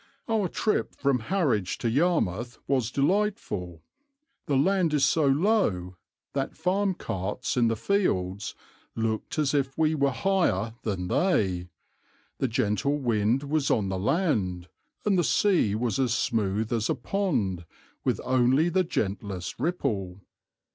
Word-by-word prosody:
"Our 220 -4 +1
trip 215 +5 -1
from 140 -3 +1
Harwich 125 - 0
to - - -2
Yarmouth 120 - 0
was 130 -5 +1
delightful; 140 - -1 0.6
the 140 -3 +2
land 170 +1 +2
is 140 -2 +4
so 150 0 +2
low 135 - +1 0.4
that 135 -1 -3
farm 190 +3 +1
carts 105 - -3
in 120 -2 +3
the 115 - +1
fields 105 - -1 0.4
looked 110 +3 -2
as 150 -2 +1
if 135 -2 0
we 160 0 +3
were 140 -2 +2
higher 135 - +1
than 95 -5 -3
they, 95 - +1 0.7
the 135 - +1
gentle 110 +5 0
wind 120 0 +1
was 145 0 0
on 100 -3 +1
the 95 -1 -2
land, 100 - 0 0.4
and 195 -3 +3
the - - +3
sea 140 - +2
was 120 +3 -1
as 125 -2 +2
smooth 110 -1 0
as 115 -2 0
a - - +2
pond 120 - -1 0.4
with - - 0
only 130 +5 +3
the 185 +2 +2
gentlest 100 - -3
ripple. 105 - -2
130 Hz, 140 wpm, -27 LUFS, 105-165 Hz, 0.7 s, is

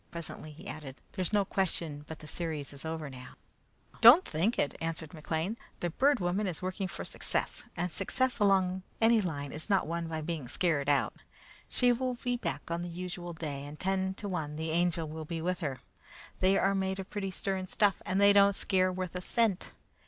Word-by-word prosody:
Presently 170 -2 -6
he 150 - -11
added, 140 -4 -7
"There's 185 -1 -2
no 205 -2 +3
question 165 -6 -1
but 160 - -6
the 155 - -11
series 155 -3 -3
is 140 +2 -10
over 160 -1 -3
now." 130 -2 -10 0.7
"Don't 245 +11 +10
think 180 +10 0
it!" 140 - +1
answered 165 -1 -3
McLean. 165 +6 -2 0.2
"The 175 - -1
Bird 275 - +3
Woman 185 +3 0
is 175 -4 -3
working 185 +1 -2
for - - -6
success, - - -2
and 175 +1 -1
success 250 +8 0
along 190 -2 +3 0.2
any 225 0 +5
line 145 -7 -3
is 155 +7 -4
not 195 -2 +3
won 170 +1 -2
by 160 -1 -3
being 155 -4 -3
scared 145 -1 +1
out. 145 -1 +2 0.5
She 245 -1 +4
will 255 +1 -1
be 245 0 -1
back 235 - -4
on 170 +1 -1
the 175 - -4
usual 175 0 -5
day, 150 -4 -4
and 145 +1 -9
ten 190 0 0
to 205 - -6
one, 155 -6 -3
the 160 +1 -2
Angel 170 -1 +1
will 155 +1 -6
be 165 +1 -4
with 180 +3 -1
her. 140 -7 -3 0.6
They 190 +1 +4
are 195 +1 +3
made 190 0 0
of 195 0 -7
pretty 200 -2 -2
stern 190 0 -3
stuff, 205 0 +2
and 190 +1 0
they 200 0 +7
don't 200 0 +6
scare 185 -2 +2
worth 185 -1 -4
a 180 - -2
cent. 220 -1 +1
180 Hz, 205 wpm, -31 LUFS, 160-195 Hz, 0.7 s, Don't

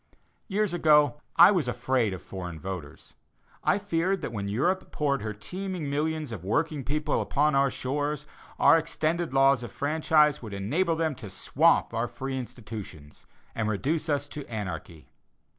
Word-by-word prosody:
Years 210 -2 0
ago, 150 -4 +4
I 175 +4 +9
was 175 -9 +1
afraid 125 -2 0
of 95 - -7
foreign 90 -4 -7
voters. 85 -4 -7 0.5
I - - +3
feared 190 -1 0
that - - -3
when 100 -2 -3
Europe 175 - 0
poured 140 -2 0
her 110 +1 -3
teeming 170 - -5
millions 155 -1 -1
of 100 -7 -6
working 145 - 0
people 150 +3 0
upon 150 +1 +1
our 135 0 +4
shores, 145 +3 -2 0.3
our 165 - +6
extended 165 +1 -1
laws 135 -1 +4
of 120 -4 -7
franchise 150 +1 +2
would 110 -4 -7
enable 160 - 0
them 160 -1 0
to 110 -6 -8
swamp 95 - +2
our 115 +1 0
free 130 +3 -5
institutions, 110 - -9 0.3
and 110 -1 -1
reduce 150 - -1
us 145 -1 0
to 145 - -6
anarchy. 90 -7 -6
140 Hz, 160 wpm, -27 LUFS, 110-160 Hz, 0.5 s, I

